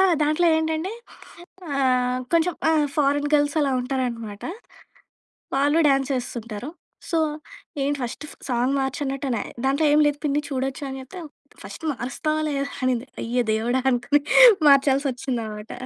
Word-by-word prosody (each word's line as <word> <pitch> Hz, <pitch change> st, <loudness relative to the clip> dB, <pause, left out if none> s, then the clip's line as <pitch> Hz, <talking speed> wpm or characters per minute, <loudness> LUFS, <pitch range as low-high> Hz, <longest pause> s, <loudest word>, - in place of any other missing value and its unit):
ఆ! -, -, +6 dB, 0.2 s
దాంట్లో 305 Hz, +4 st, +2 dB
ఏంటంటే 320 Hz, +3 st, -1 dB, 0.9 s
ఆహ్, 255 Hz, -2 st, +1 dB
కొంచెం 335 Hz, +1 st, +2 dB, 0.2 s
ఆహ్, 310 Hz, -2 st, +3 dB
ఫారెన్ 290 Hz, 0 st, +2 dB
గర్ల్స్ 290 Hz, +1 st, +2 dB
అలా 285 Hz, -2 st, +1 dB
ఉంటారనమాట. 240 Hz, -5 st, -4 dB, 1.1 s
వాళ్ళు 285 Hz, +3 st, +2 dB
డ్యాన్స్ 275 Hz, 0 st, +2 dB
యేస్తుంటారు. 240 Hz, -1 st, -5 dB, 0.4 s
సో, 335 Hz, -, +1 dB, 0.7 s
ఏంటి 285 Hz, +1 st, 0 dB
ఫస్ట్ 245 Hz, +5 st, -6 dB, 0.2 s
సాంగ్ 250 Hz, +2 st, +1 dB
మార్చనట్టు 270 Hz, +1 st, -3 dB
అనే. 240 Hz, -, -1 dB, 0.2 s
దాంట్లో 280 Hz, +4 st, +2 dB
ఏం 300 Hz, -, +5 dB
లేదు 290 Hz, -1 st, +1 dB
పిన్ని 295 Hz, 0 st, +1 dB
చూడొచ్చు 270 Hz, +1 st, -3 dB
అని 265 Hz, 0 st, -6 dB
చెప్తే, 270 Hz, +8 st, -10 dB, 0.4 s
"ఫస్ట్ -, -, -10 dB
మారుస్తావా 285 Hz, +5 st, -2 dB
లేదా" 280 Hz, -1 st, -1 dB, 0.2 s
అనింది. 255 Hz, 0 st, 0 dB, 0.2 s
అయ్య 245 Hz, +1 st, 0 dB
దేవుడా! 235 Hz, +4 st, 0 dB
అనుకుని 250 Hz, +4 st, +2 dB, 0.5 s
మార్చాల్సి 275 Hz, 0 st, +4 dB
వచ్చిందన్నమాట. 225 Hz, -4 st, -5 dB
270 Hz, 130 wpm, -23 LUFS, 250-290 Hz, 1.1 s, ఆ